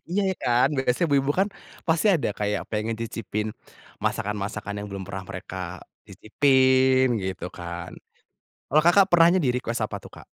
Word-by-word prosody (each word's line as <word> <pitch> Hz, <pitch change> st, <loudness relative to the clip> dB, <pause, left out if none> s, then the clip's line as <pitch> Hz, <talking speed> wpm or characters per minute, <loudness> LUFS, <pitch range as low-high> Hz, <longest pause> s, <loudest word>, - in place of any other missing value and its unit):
Iya 190 Hz, +3 st, +1 dB
ya -, -, -2 dB
kan, 125 Hz, +1 st, +3 dB
biasanya 130 Hz, +5 st, +1 dB
ibu-ibu 140 Hz, 0 st, +2 dB
kan, 195 Hz, -, +3 dB, 0.4 s
pasti 165 Hz, +5 st, +2 dB
ada 150 Hz, -, 0 dB
kayak 105 Hz, 0 st, -1 dB
pengen 110 Hz, +1 st, -1 dB
cicipin, 110 Hz, -2 st, -3 dB, 0.6 s
masakan-masakan 105 Hz, 0 st, -2 dB
yang 105 Hz, -, -5 dB
belum 100 Hz, -1 st, -6 dB
pernah 95 Hz, -1 st, -6 dB
mereka, 95 Hz, 0 st, -7 dB, 0.5 s
cicipin, 130 Hz, +1 st, +3 dB, 0.2 s
gitu 95 Hz, 0 st, -4 dB
kan. 85 Hz, 0 st, -6 dB, 0.8 s
Kalau 155 Hz, +2 st, +4 dB
Kakak 190 Hz, +3 st, +6 dB
pernahnya 175 Hz, +2 st, +6 dB
di -, -, +2 dB
request 120 Hz, -2 st, -2 dB
apa 105 Hz, -, -6 dB
tuh -, -, -12 dB
Kak? -, -, -13 dB
120 Hz, 155 wpm, -25 LUFS, 100-140 Hz, 0.8 s, Kakak